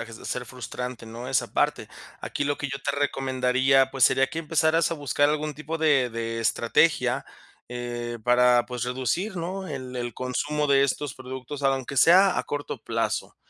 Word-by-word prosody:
a 115 - -5 0.2
ser 125 -1 -4
frustrante, 125 -1 -7
¿no?, 120 +3 -7
esa 130 - 0
parte. - - 0 0.3
Aquí - - -3
lo 145 0 0
que 140 - -4
yo 140 +1 -4
te 140 - -1
recomendaría, 135 -1 +2
pues 135 -3 +3
sería 135 0 +4
que 165 - -5
empezaras 160 +1 +2
a - - -1
buscar 145 -1 +1
algún 150 0 -1
tipo 155 +2 -5
de 145 -6 +3
de 115 0 -4
estrategia, 115 - +2 0.4
eh, 120 -1 -5
para, 125 0 +4
pues, 125 -1 -4
reducir, 130 - -2
¿no?, 185 +3 -4
el 130 -3 -6
el 120 -2 -4
consumo 145 +4 -2
de 140 0 +5
estos 140 0 -2
productos, 130 +2 -7
aunque 135 0 0
sea 185 +6 +6
a - - -2
corto 145 0 -4
plazo, - - -2
135 Hz, 175 wpm, -25 LUFS, 125-150 Hz, 0.4 s, sea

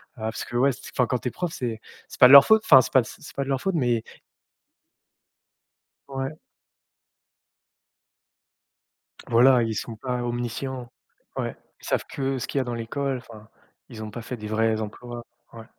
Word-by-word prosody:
parce 110 -1 -4
que, 120 - -9
ouais, 135 +3 +3
c 130 - -9 0.2
enfin, 125 -3 +2
quand 125 - 0
tu 125 - -6
es - - -2
prof, 175 -3 -4
c'est 115 -3 -4 0.3
c'est - - -12
pas 125 - +11
de - - +5
leur 140 -1 +11
faute, 220 0 +5
enfin, 130 - +8
c'est 125 - -6
pas 130 - +6
de - - -8
c'est 150 - -12
pas 140 - -1
de 135 - -7
leur 135 -1 0
faute, 190 +2 -2
mais 120 -6 +1 2.1
Ouais. 135 +2 -4 2.9
Voilà, 125 +1 +5
ils 110 -1 -2
sont 115 +1 -5
pas 125 +1 -3
omniscients. 120 +1 -4 0.5
Ouais, - - -3 0.2
ils - - -13
savent - - 0
que 135 -1 -2
ce - - -4
qu'il 140 - -2
y - - +2
a - - 0
dans 120 -1 -4
l'école, 130 +3 -3
enfin, 110 -3 -14 0.4
ils 110 -3 -9
ont 110 - -6
pas 115 +2 -7
fait 125 +2 -6
des 105 -1 -8
vrais 110 0 +1
emplois. 120 +2 -7 0.3
Ouais. 115 -1 -10
120 Hz, 190 wpm, -25 LUFS, 115-135 Hz, 2.9 s, pas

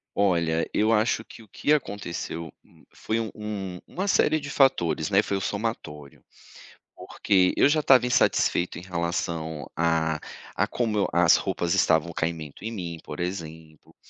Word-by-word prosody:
Olha, 85 -5 +1
eu 110 +1 +2
acho 110 0 +2
que 115 - -14
o - - -19
que 145 - -2
aconteceu, 90 - -2
hum, - - -23
foi 110 +1 -2
um 110 -2 -3
um 100 -4 -5
uma 190 +3 -4
série 155 -4 +3
de 140 - -7
fatores, 105 - +2
né, 100 0 +4
foi 100 -2 -2
o - - -4
somatório. 95 - -5 0.7
Porque 95 -3 +1
eu - - +6
já 155 +1 +2
estava 130 -3 +5
insatisfeito 105 -7 +2
em 85 - -7
relação 85 -3 -3
a 80 -2 +1 0.4
a - - +1
como 110 -4 0
as - - +5
roupas 85 -1 -1
estavam 80 +1 +2
caimento 80 -1 -4
em 115 - -4
mim, 85 -6 -5
por 75 - -8
exemplo, 80 -3 -7
90 Hz, 155 wpm, -25 LUFS, 80-110 Hz, 0.7 s, eu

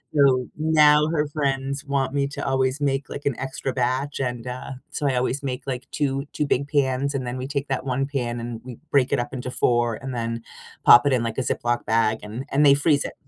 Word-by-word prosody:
So, 130 -3 +4
now 150 -1 +5
her 150 -2 0
friends 140 -1 -2
want 135 -1 -1
me 140 -1 +1
to - - -5
always 135 +1 0
make, 135 -1 0
like, 140 - -7
an 140 -4 0
extra 135 0 -3
batch 130 +3 -1
and, 125 -2 -3
uh, 130 +2 -6 0.2
so, 145 -3 -2
I 130 - +1
always 130 +3 -1
make, 125 -2 -3
like, 125 -1 -4
two 140 -1 -1
2 150 - 0
big 140 +2 +1
pans 140 -1 +1
and 130 -2 -2
then 125 +1 -3
we 130 +1 -4
take 140 0 -3
that 135 0 -2
1 135 +1 0
pan 120 -4 -2
and 115 -1 -6
we 125 -3 -9
break 135 -3 +3
it 135 - +2
up 120 - -4
into 125 0 -4
4 120 -2 +1
and 130 +2 -6
then 115 0 -3 0.4
pop 120 +3 +9
it 135 - +3
in, 120 -2 +1
like, 115 +1 -3
a - - +1
Ziploc 120 -1 -1
bag 110 0 +2
and 115 +6 -6
and 145 +2 +3
they 140 - +8
freeze 145 0 +2
it. - - -5
135 Hz, 235 wpm, -24 LUFS, 125-140 Hz, 0.4 s, pop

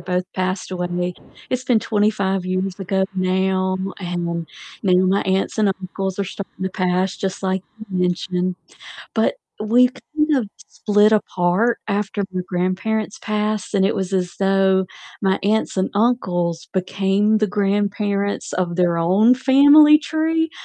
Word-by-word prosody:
both 180 0 -2
passed 185 0 -2
away, 180 0 -2 0.4
it's 255 0 -2
been 240 -4 +2
25 205 -4 0
years 185 +1 -2
ago 190 0 0
now, 185 0 0 0.2
and 175 -2 -3 0.4
now 185 -3 +3
my 195 +2 +2
aunts 190 +3 -1
and 215 -2 +3
uncles 190 0 -4
are - - 0
starting 195 0 -8
to 190 - -1
pass, 185 +1 0
just 190 0 -4
like 190 -1 -1 0.3
you 185 - -2
mentioned. 180 0 -1 0.6
But - - +2 0.3
we 240 +4 +4
kind 305 +3 -1
of 235 -6 -1 0.2
split 210 0 +2
apart 205 +2 +1
after 205 0 -1
my 185 -1 -2
grandparents 190 +4 -2
passed, 215 0 -2
and 195 -1 +3
it 200 - 0
was 190 0 -3
as 180 -2 -1
though 195 -1 +3 0.4
my 190 -1 +2
aunts 215 +2 0
and 185 - +1
uncles 180 -7 0
became 195 +3 +1
the 215 - +1
grandparents 200 0 -1
of 175 -2 -2
their 175 -2 +2
own 195 +9 +4
family 285 +3 +7
tree, 320 +1 -1
195 Hz, 145 wpm, -20 LUFS, 185-215 Hz, 0.6 s, family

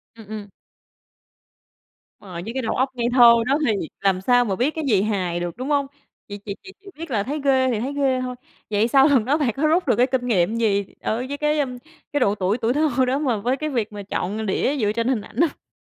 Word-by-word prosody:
Ừm, 220 -3 -13
ừm. 210 -1 -7 1.7
Rồi, 180 -4 -8
với 225 +3 -6
cái 265 - -2
đầu 225 - -2
óc 260 +1 +1
ngây 240 -1 -1
thơ 240 -2 +8
đó 275 +2 +3
thì 220 - +2 0.3
làm 190 -2 +1
sao 245 +3 +3
mà 195 -3 -1
biết 270 +8 0
cái 320 - -3
gì 205 -6 +3
hài 185 -5 -1
được, 175 +3 -5
đúng 260 +3 -4
hông? 280 -2 +1 0.4
Chỉ 205 0 -7
chỉ 200 0 -7
chỉ 385 - -11
chỉ 400 - -21
biết 330 -2 -7
là 205 -4 +1
thấy 290 +4 -4
ghê 260 -2 +3
thì 215 - -1
thấy 270 +5 -3
ghê 265 -3 +1
thôi. 250 0 -4 0.3
Vậy 210 +2 +2
sau 270 +3 +5
lần 265 -7 +3
đó 285 +5 +2
bạn 285 -6 +1
có 305 +3 +1
rút 335 0 +2
được - - +3
cái 250 +2 +3
kinh 250 -1 -1
nghiệm 205 0 +1
gì 200 -4 +1 0.2
ở 220 - -1
với 285 - -4
cái 300 0 +1 0.5
cái 290 - +2
độ 205 -4 +2
tuổi 200 +3 0
tuổi 240 +1 0
thơ 275 -4 +2
đó 265 +3 0
mà 255 -7 0
với 245 +6 -1
cái 305 +1 -3
việc 220 -6 -2
mà 205 - -7
chọn 205 +2 -3
đĩa 265 +8 0
dựa 210 -4 +1
trên 230 +2 -1
hình 250 -5 +1
ảnh 215 - -14
hông? 330 -4 -2
245 Hz, 250 wpm, -22 LUFS, 210-275 Hz, 1.7 s, thơ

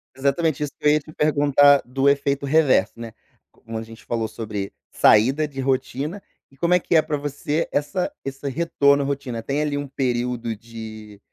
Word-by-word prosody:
Exatamente 140 +3 0
isso 145 - -3
que - - -10
eu, - - +7
ia, 150 - +3
te 155 - -14
perguntar 145 -2 +4
do 135 +3 0
efeito 140 0 +1
reverso, 150 -1 +3
né, 115 -2 -8 0.4
como 115 0 -8
a - - -5
gente 115 0 -12
falou 115 -1 -2
sobre 105 -3 -5 0.2
saída 135 +8 +4
de 135 -2 -9
rotina, 135 +7 -2 0.3
e 135 - -22
como 170 +4 +3
é 180 - +4
que 170 - -1
é 160 - +7
pra 150 -1 -3
você, 145 +2 -2
essa 180 - -1
esse 135 +1 -6
retorno 140 -1 +2
à - - -3
rotina, 135 -5 -3
tem, 140 +5 -2
ali, 150 -1 -1
um 145 0 -3
período 120 -3 -2
de 110 -2 -10
140 Hz, 190 wpm, -22 LUFS, 120-145 Hz, 0.4 s, eu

